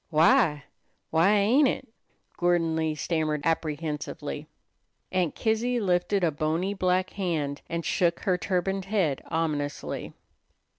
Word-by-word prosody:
"Why 160 - +4 0.5
why 165 +6 +4
ain't 225 +8 +4
it?" - - -2 0.5
Gordon 175 -2 +2
Lee 160 -1 0
stammered 155 -1 -1
apprehensively. 155 -2 -3 0.6
Aunt 180 -4 0
Kizzy 235 +2 0
lifted 190 0 +1
a 165 - +3
bony 160 +6 -1
black 185 -1 +1
hand, 160 -7 -2
and 170 0 -3
shook 170 -2 +1
her 185 -4 +2
turbaned 190 +1 -1
head 190 -9 0
ominously. 155 -3 -2
175 Hz, 115 wpm, -27 LUFS, 155-195 Hz, 0.6 s, Why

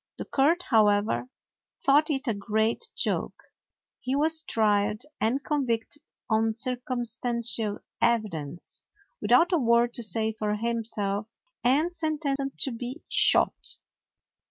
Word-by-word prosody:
The - - -6
court, 320 +6 +2
however, 210 0 +2 0.6
thought 295 +3 +4
it 280 -1 -1
a 230 - +2
great 220 - 0
joke. - - -2 0.6
He 255 +2 -2
was 315 +2 +2
tried 210 -4 +1 0.2
and 255 +5 0
convicted 270 -1 -2 0.3
on 220 -1 +1
circumstantial 240 -3 -2 0.2
evidence, 185 -10 -1 0.4
without 345 +2 +4
a 345 - +3
word 235 -1 +3
to - - -2
say 220 +1 0
for 210 -1 -2
himself, 215 -2 -2 0.4
and 300 +8 +2
sentenced 290 -4 -2
to 270 - +2
be 245 +6 -7
shot. - - +3
235 Hz, 115 wpm, -27 LUFS, 220-275 Hz, 0.6 s, thought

